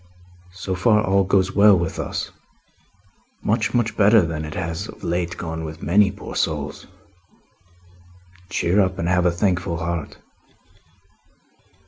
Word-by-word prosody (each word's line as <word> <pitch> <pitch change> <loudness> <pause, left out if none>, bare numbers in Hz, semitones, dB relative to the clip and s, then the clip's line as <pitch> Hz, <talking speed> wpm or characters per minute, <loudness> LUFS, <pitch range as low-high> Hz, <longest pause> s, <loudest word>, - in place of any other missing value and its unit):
So 95 0 -4
far 105 +4 +3
all 95 0 +3
goes 95 0 +2
well 100 -1 +6
with 85 -2 -3
us - - -4 1.1
much, 110 +1 0
much 120 -1 +1
better 105 0 +5
than 80 -2 -3
it 75 - -7
has 85 -3 -4
of - - -13
late 85 0 -2
gone 80 -1 -5
with 80 +1 -8
many 100 +3 +4
poor - - -9
souls. - - -2 1.6
Cheer 90 +2 +2
up, 95 -1 0
and 85 - -2
have 90 0 +2
a - - +3
thankful 90 -1 0
heart." 85 -1 -4
90 Hz, 135 wpm, -22 LUFS, 85-100 Hz, 1.6 s, well